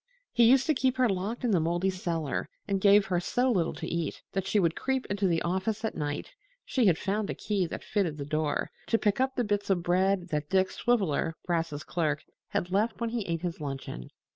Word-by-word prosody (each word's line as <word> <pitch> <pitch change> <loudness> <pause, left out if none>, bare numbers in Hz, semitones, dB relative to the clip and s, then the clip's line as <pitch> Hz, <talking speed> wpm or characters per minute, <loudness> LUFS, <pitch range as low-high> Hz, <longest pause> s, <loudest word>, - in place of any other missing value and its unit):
He 235 0 +5
used 265 +1 +5
to 310 - +3
keep 260 -1 +1
her 255 -1 +4
locked 205 +5 -2
in 240 - +2
the 185 - +4
moldy 175 +4 +1
cellar 165 -5 -2 0.2
and 195 -2 0
gave 200 0 +6
her 180 -2 0
so 250 +8 +1
little 175 -7 +1
to - - -5
eat 170 -2 -3
that 195 -1 -2
she 210 - +3
would 170 -3 +2
creep 265 -1 -1
into 200 -1 +1
the 165 -2 +1
office 190 +5 -1
at - - -1
night 145 -1 -3 0.3
(she 250 -5 +2
had 170 -4 +4
found 205 +2 -1
a - - -2
key 200 -4 -1
that - - -6
fitted 180 -8 -1
the 140 - -4
door) 155 0 -1 0.2
to 225 - +3
pick 210 +2 +1
up 265 0 +1
the 245 - +1
bits 205 -2 -1
of 180 -3 +2
bread 185 +1 +2
that 150 -2 -2
Dick 190 0 +2
Swiveller, 185 -9 +1
Brass's 165 -4 -1
clerk, 155 -3 -1 0.2
had 180 - -2
left 215 +4 +1
when 230 -1 -1
he 230 -4 -2
ate 165 0 -2
his 170 -3 -3
luncheon. 135 - -5
190 Hz, 225 wpm, -29 LUFS, 165-215 Hz, 0.3 s, gave